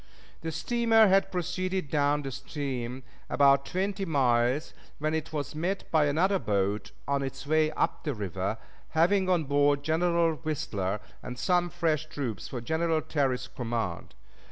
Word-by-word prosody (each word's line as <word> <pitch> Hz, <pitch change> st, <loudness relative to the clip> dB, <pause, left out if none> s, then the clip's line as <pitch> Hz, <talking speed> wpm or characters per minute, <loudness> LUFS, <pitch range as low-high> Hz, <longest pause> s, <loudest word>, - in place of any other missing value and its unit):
The 160 Hz, -, -3 dB
steamer 225 Hz, +6 st, +4 dB
had 195 Hz, +1 st, +3 dB
proceeded 185 Hz, -2 st, -2 dB
down 145 Hz, -1 st, +2 dB
the 135 Hz, -, -4 dB
stream 130 Hz, -2 st, -4 dB, 0.3 s
about 140 Hz, -1 st, +4 dB
twenty 195 Hz, +2 st, -1 dB
miles 130 Hz, -3 st, +2 dB, 0.2 s
when 155 Hz, +1 st, -1 dB
it 160 Hz, -1 st, -2 dB
was 150 Hz, -1 st, -3 dB
met 180 Hz, +6 st, -2 dB
by 155 Hz, -2 st, +4 dB
another 180 Hz, +7 st, +2 dB
boat 100 Hz, -2 st, -1 dB, 0.2 s
on 140 Hz, 0 st, +1 dB
its 135 Hz, 0 st, -5 dB
way 155 Hz, +1 st, +3 dB
up 165 Hz, +2 st, -1 dB
the 145 Hz, -4 st, -2 dB
river, 100 Hz, +1 st, -3 dB, 0.4 s
having 185 Hz, +3 st, +4 dB
on 175 Hz, -3 st, +3 dB
board 145 Hz, 0 st, +2 dB
General 165 Hz, 0 st, +2 dB
Whistler 105 Hz, -9 st, -2 dB, 0.2 s
and 125 Hz, -, -7 dB
some 175 Hz, +5 st, +2 dB
fresh 155 Hz, -2 st, 0 dB
troops 130 Hz, -8 st, -4 dB
for 125 Hz, -, -5 dB
General 160 Hz, +4 st, 0 dB
Terry's 135 Hz, -5 st, 0 dB
command. 115 Hz, -8 st, -4 dB
150 Hz, 150 wpm, -28 LUFS, 130-170 Hz, 0.4 s, steamer